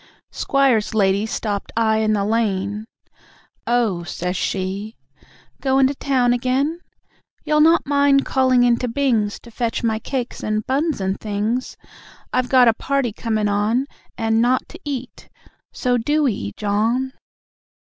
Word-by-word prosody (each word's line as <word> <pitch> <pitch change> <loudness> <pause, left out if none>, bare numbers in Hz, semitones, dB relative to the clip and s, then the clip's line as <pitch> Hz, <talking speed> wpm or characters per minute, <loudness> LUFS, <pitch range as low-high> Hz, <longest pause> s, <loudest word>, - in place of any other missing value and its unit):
Squire's 260 -6 +1
lady 200 0 +2
stopped 205 -2 -3
I 220 -1 +3
in 215 0 +1
the 200 -1 0
lane, 210 -1 -1 0.8
"Oh," 230 -7 +1
says 180 +1 -4
she, 195 +4 -3 0.7
"goin' 270 0 +3
to 270 - +1
town 255 -3 +1
again? 265 +7 0 0.7
You'll 300 0 +3
not 330 +2 +5
mind 280 -1 +3
calling 255 -2 +3
into 245 +1 +2
Bings 230 -5 0
To 235 - -14
fetch 235 0 -2
my 220 -1 0
cakes 255 +1 -4
and 215 0 -2
buns 285 -1 0
and 190 0 -1
things? 215 +4 -2 0.6
I've 255 0 0
got 255 -2 +6
a 230 - +5
party 270 -1 -1
comin' 220 -2 -1
on, 210 +6 +1 0.3
And 225 0 +1
nought 250 +2 +1
to 340 - -11
eat... 265 -4 -6 0.4
so, 245 -1 0
DO 295 +5 +1
'ee, 100 - -4
John." 225 +6 0
235 Hz, 140 wpm, -21 LUFS, 210-265 Hz, 0.8 s, got